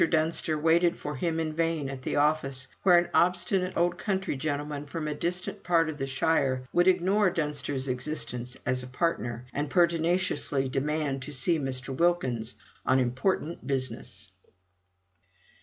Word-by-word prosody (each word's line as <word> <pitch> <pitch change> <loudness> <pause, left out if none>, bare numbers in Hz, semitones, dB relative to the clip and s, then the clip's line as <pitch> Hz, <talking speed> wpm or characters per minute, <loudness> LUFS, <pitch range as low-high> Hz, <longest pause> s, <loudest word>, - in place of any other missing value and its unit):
Dunster 160 -1 +1
waited 165 +3 +3
for 150 0 -5
him 165 +3 -1
in 155 -1 -2
vain 165 -3 0
at 135 -1 -6
the - - -2
office, 140 -3 +1
where 180 -2 +6
an 175 0 +3
obstinate 180 +1 +2
old 175 +1 +1
country 190 -6 -1
gentleman 145 +1 -3
from 155 +1 -4
a 150 - -1
distant 180 +4 -3
part 165 -2 +2
of 150 -1 -6
the 135 - -2
shire 135 -2 +1
would 175 +1 +4
ignore 190 +2 +4
Dunster's 150 -5 -2
existence 125 -1 -3
as 125 +1 +1
a 125 - -8
partner, 125 -4 -2
and 145 +1 -2
pertinaciously 170 -5 +2
demanded 140 0 -1
to 150 +3 -7
see 160 +5 +1
Mr. 130 -1 -2
Wilkins 130 -9 0 0.3
on 130 - +3
important 130 +4 -1
business. 120 -7 -4
150 Hz, 150 wpm, -28 LUFS, 130-170 Hz, 0.3 s, where